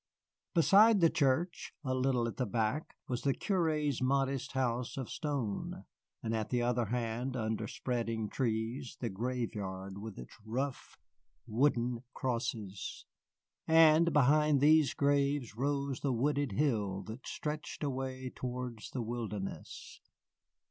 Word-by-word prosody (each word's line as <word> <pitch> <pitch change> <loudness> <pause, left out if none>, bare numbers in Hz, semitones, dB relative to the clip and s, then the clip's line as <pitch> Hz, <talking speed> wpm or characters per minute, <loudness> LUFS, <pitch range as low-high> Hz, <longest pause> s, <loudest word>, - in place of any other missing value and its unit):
Beside 205 +6 +7
the 165 -2 +5
church, 155 +5 0
a 130 -2 -1
little 130 -2 +1
at 115 - -6
the 125 - 0
back, 115 +8 -1
was 125 -1 -2
the 140 -1 +1
curé's 155 - 0
modest 135 0 +1
house 125 -2 -1
of 130 -3 -4
stone, 135 -9 -3 0.4
and 115 - -1
at 110 -1 -2
the 125 - +1
other 120 0 +1
hand, 120 +3 -2
under 110 -2 -1
spreading 115 -3 -2
trees, 120 +2 -2
the 120 - -2
graveyard 100 -4 -3
with 110 -1 -7
its 60 - -10
rough 130 +5 -3 0.5
wooden 120 0 +1
crosses. 115 -6 -3 0.6
And 160 +1 +6
behind 150 +1 +4
these 155 +1 +5
graves 140 -4 +1
rose 140 +1 -1
the 140 - 0
wooded 140 0 +1
hill 105 -6 0
that 110 +6 -8
stretched 155 +1 -4
away 130 -2 -3
towards 125 -3 -5
the 125 - -3
wilderness. 110 -4 -5
125 Hz, 125 wpm, -33 LUFS, 115-140 Hz, 0.6 s, Beside